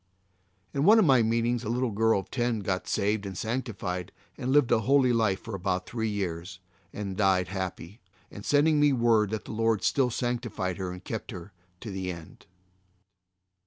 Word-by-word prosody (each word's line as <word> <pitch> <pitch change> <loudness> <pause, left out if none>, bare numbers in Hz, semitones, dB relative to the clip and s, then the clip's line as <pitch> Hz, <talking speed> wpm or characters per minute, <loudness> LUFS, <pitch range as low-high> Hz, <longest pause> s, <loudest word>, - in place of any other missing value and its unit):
In 140 - 0
one 210 +7 +7
of 220 - +5
my 130 -5 +5
meetings 115 +2 +1
a 110 - -4
little 125 0 0
girl 110 -1 +2
of - - -19
ten 120 -3 0
got 95 -1 -2
saved 105 0 0
and 95 -3 -6
sanctified 105 -7 -3 0.2
and 130 - -3
lived 140 -3 +4
a 120 - +5
holy 130 +2 +3
life 110 -4 +1
for 115 - -8
about 95 -1 -2
three 110 -2 -2
years 90 -3 -4 0.3
and 100 -1 -5
then 95 - -5
died 95 -3 +2
happy, 95 +1 -5 0.4
sending 150 +6 +3
me 145 -1 +4
word 115 -4 +3
that 110 0 -4
the - - -7
Lord 115 -1 +1
still 135 -3 +2
sanctified 120 -7 -2
her 95 -2 -4
and 90 +1 -9
kept 110 +2 -5
her 95 -3 -8 0.3
to 110 - -6
the 95 -1 -3
end. 85 -2 -12
110 Hz, 185 wpm, -28 LUFS, 95-120 Hz, 0.4 s, one